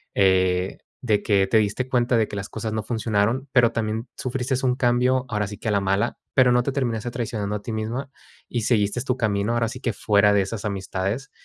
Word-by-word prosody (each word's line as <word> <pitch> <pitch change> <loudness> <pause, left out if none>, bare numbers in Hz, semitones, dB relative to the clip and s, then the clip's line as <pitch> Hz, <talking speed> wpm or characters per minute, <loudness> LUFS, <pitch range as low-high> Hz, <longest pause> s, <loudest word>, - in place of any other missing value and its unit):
eh, 95 -1 +2 0.2
de 110 -5 +1
que 100 -2 +3
te 110 - +3
diste 110 +5 0
cuenta 120 -1 +2
de 110 -2 +2
que - - -7
las 100 +2 -5
cosas 110 -1 -4
no 110 - -1
funcionaron, 115 +3 0
pero, 120 -2 +5
también 115 +1 -2
sufristes 130 0 -2
un 125 -1 +2
cambio, 125 0 +2
ahora 105 -2 0
sí 105 - -8
que - - -6
a 110 - +2
la 100 - +3
mala, 95 +1 0 0.2
pero, 130 -1 +5
no 125 0 +3
te 140 - -1
terminaste 120 -3 -2
traicionando 105 -4 -3
a - - -11
ti 115 - -6
misma 115 +5 -3 0.4
y 120 - -1
seguiste 105 +1 +1
tu 125 - 0
camino, 105 -2 0
ahora 120 -1 +1
sí 125 - -7
que 120 - -1
fuera 105 0 +3
de 100 - +4
esas 100 +3 -4
amistades. 100 +5 -3
110 Hz, 220 wpm, -24 LUFS, 100-125 Hz, 0.4 s, pero